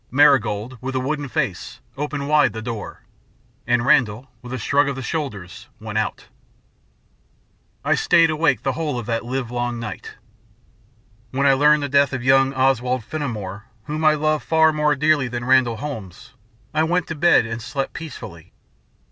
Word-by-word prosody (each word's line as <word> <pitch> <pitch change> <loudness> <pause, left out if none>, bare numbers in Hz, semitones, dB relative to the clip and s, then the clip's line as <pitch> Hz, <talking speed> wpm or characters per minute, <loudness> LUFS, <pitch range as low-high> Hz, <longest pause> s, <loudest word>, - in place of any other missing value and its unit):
Marigold, 130 -4 +2
with 130 +1 -4
a - - +1
wooden 145 +2 -3
face, 90 -6 -3 0.2
opened 145 0 -4
wide 150 -1 +3
the 110 - -6
door, 115 -2 -6 0.6
and 120 -1 +2
Randall, 125 0 +2
with 125 - -10
a 130 - -3
shrug 140 +4 +1
of 140 - -3
the 130 - -6
shoulders, 120 - -5
went - - -3
out. - - -3 1.6
I - - +3
stayed 165 -2 +4
awake 155 -3 +1
the 135 - +1
whole 150 -1 -3
of 120 - -5
that 115 0 -2
livelong 120 -1 -3
night. 110 -4 -7 1.1
When 135 +3 -1
I 135 - +6
learned 150 +2 +4
the - - -1
death 140 0 +3
of 130 -2 -3
young 135 +1 +4
Oswald 130 -2 +1
Fenimore, 110 -8 -5 0.2
whom 155 +6 -4
I 155 0 +5
loved 155 0 0
far 160 -1 +3
more 150 -1 +2
dearly 150 -1 +2
than 120 0 -5
Randall 130 -3 +3
Holmes, 110 -6 -8 0.4
I 155 - +2
went 175 +2 +1
to - - -2
bed 165 -5 +4
and 115 0 -5
slept 130 +3 -4
peacefully. 105 - -9
130 Hz, 165 wpm, -21 LUFS, 120-150 Hz, 1.6 s, I